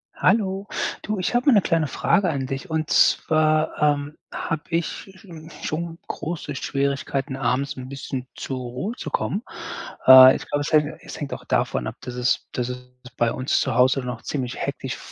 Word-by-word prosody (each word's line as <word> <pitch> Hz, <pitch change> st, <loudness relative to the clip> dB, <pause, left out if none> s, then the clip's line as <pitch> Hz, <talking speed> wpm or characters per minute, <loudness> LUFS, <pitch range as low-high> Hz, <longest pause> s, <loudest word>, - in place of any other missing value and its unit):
Hallo. 195 Hz, -1 st, +1 dB, 0.3 s
Du, 210 Hz, 0 st, -3 dB
ich 185 Hz, -, -1 dB
habe 245 Hz, +3 st, +1 dB
mal 280 Hz, -, +7 dB
‘ne 205 Hz, -, +6 dB
kleine 165 Hz, -4 st, +1 dB
Frage 185 Hz, +6 st, +2 dB
an 140 Hz, -4 st, -2 dB
dich. 135 Hz, +4 st, -5 dB
Und 160 Hz, -1 st, -1 dB
zwar, 155 Hz, 0 st, +3 dB
ähm, 145 Hz, 0 st, +1 dB, 0.2 s
habe 165 Hz, -2 st, -3 dB
ich 165 Hz, -1 st, +1 dB, 0.3 s
sch 185 Hz, -, -17 dB
n 160 Hz, -3 st, -11 dB
schon 165 Hz, +1 st, -3 dB
große 155 Hz, -3 st, -5 dB
Schwierigkeiten, 140 Hz, 0 st, -2 dB
abends 135 Hz, +3 st, -1 dB
‘n 130 Hz, 0 st, -7 dB
bisschen 135 Hz, -2 st, -5 dB
zur 130 Hz, -1 st, -4 dB
Ruhe 125 Hz, -, -4 dB
zu -, -, -6 dB
kommen. 200 Hz, -, -1 dB, 0.7 s
Äh, 130 Hz, 0 st, +11 dB
ich -, -, -6 dB
glaube, 145 Hz, -, -1 dB
es 145 Hz, -, -3 dB
hängt 150 Hz, -1 st, +2 dB
es -, -, -9 dB
hängt 145 Hz, -, -4 dB
auch -, -, -8 dB
davon 65 Hz, -2 st, 0 dB
ab, -, -, -5 dB
dass 125 Hz, -, -7 dB
es 125 Hz, 0 st, 0 dB
dass 125 Hz, 0 st, -2 dB
es 125 Hz, 0 st, -7 dB, 0.3 s
bei 120 Hz, -1 st, +2 dB
uns 130 Hz, +1 st, 0 dB
zu 130 Hz, -, 0 dB
Hause 130 Hz, +2 st, +4 dB
noch 125 Hz, -2 st, -5 dB
ziemlich 130 Hz, -4 st, -3 dB
hektisch -, -, -4 dB
145 Hz, 190 wpm, -23 LUFS, 130-165 Hz, 0.7 s, Äh